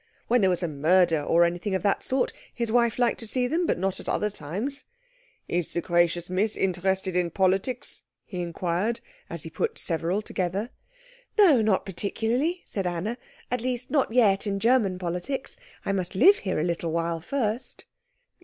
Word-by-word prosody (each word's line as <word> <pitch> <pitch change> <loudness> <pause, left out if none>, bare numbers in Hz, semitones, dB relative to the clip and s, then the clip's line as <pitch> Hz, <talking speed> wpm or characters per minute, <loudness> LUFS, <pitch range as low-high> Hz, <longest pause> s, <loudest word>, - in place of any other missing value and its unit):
When 245 0 +3
there 190 - +4
was 180 0 0
a - - +1
murder, 165 +2 +3
or 165 +4 +4
anything 175 +3 0
of 190 - -2
that 200 - +2
sort, 260 0 0 0.2
his 235 -2 -2
wife 235 -1 +3
liked 245 -1 +2
to 230 - -3
see 250 +3 +1
them, 330 +7 0
but - - +1
not 190 +1 -1
at - - -6
other 210 0 0
times. 210 - -4 0.6
"Is 175 -2 -1
the 170 - 0
gracious 175 0 +1
Miss 195 +4 0
interested 190 0 0
in 180 -1 +1
politics?" 190 +8 0 0.2
he 180 -3 -5
inquired, 175 +6 -1 0.3
as - - -3
he - - -8
put 460 - -2
several 170 +4 0
together. 195 +6 -2 0.7
"No, 335 - +6
not 210 -3 +2
particularly," 230 - -1
said 195 -3 -2
Anna; 180 +7 -2 0.4
"at 250 -1 0
least, 250 0 -2
not 280 -6 +2
yet 215 -4 +3
in 200 -1 -1
German 225 -5 +3
politics. 180 +10 -3 0.3
I - - 0
must 185 -1 -2
live 390 - +7
here 185 -5 -2
a - - +1
little 170 -1 -1
while 165 0 -1
first." 225 - -3
195 Hz, 180 wpm, -26 LUFS, 175-235 Hz, 0.7 s, live